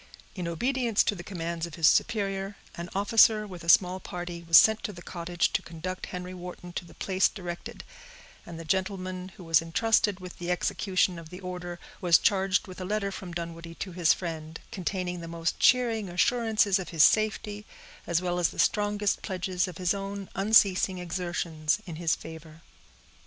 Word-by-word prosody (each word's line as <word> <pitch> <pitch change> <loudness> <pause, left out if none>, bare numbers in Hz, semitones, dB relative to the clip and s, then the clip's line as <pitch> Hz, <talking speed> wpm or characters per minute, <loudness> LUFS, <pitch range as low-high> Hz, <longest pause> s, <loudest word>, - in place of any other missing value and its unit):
In 180 -3 -4
obedience 240 +5 +1
to - - +1
the 175 -3 -8
commands 170 -2 -4
of 170 - -10
his 165 -2 +4
superior, 200 -3 +1 0.2
an 170 +1 -6
officer, 215 +1 +5
with 180 -4 -9
a 170 - -4
small 180 +1 +5
party, 175 -2 -6
was 165 - +8
sent 220 0 +6
to - - -4
the 175 -3 -11
cottage 175 0 -1
to - - +1
conduct 175 +3 -6
Henry 180 0 -6
Wharton 180 -1 -9
to 175 - -4
the 170 - -16
place 190 0 +2
directed; 175 -3 -7 0.6
and 170 -1 -9
the 165 - -8
gentleman 185 0 -2
who 185 - -10
was 165 -1 +4
intrusted 205 +3 +1
with 180 -1 -10
the 175 0 -4
execution 180 0 0
of 165 -1 -11
the 180 +1 -9
order 180 -2 -6 0.2
was 175 -2 +6
charged 195 -2 +2
with 185 -1 -9
a - - -3
letter 200 +1 -1
from 185 -2 -7
Dunwoodie 170 0 -6
to 190 - -6
his 170 -2 +3
friend, 160 -2 -4
containing 180 -2 -3
the 165 - -7
most 165 0 -2
cheering 230 -5 +3
assurances 215 +1 +2
of 185 - -6
his 160 -4 +4
safety, 210 -1 +2 0.4
as 170 +1 +1
well 175 0 -1
as 175 - +2
the - - -12
strongest 205 -1 +1
pledges 185 -1 -2
of 180 -2 -8
his 180 0 +1
own 200 0 -5
unceasing 195 -2 +4
exertions 170 -3 -2
in 165 -4 -7
his 165 -2 +1
favor. 160 0 -11
180 Hz, 185 wpm, -28 LUFS, 170-200 Hz, 0.6 s, was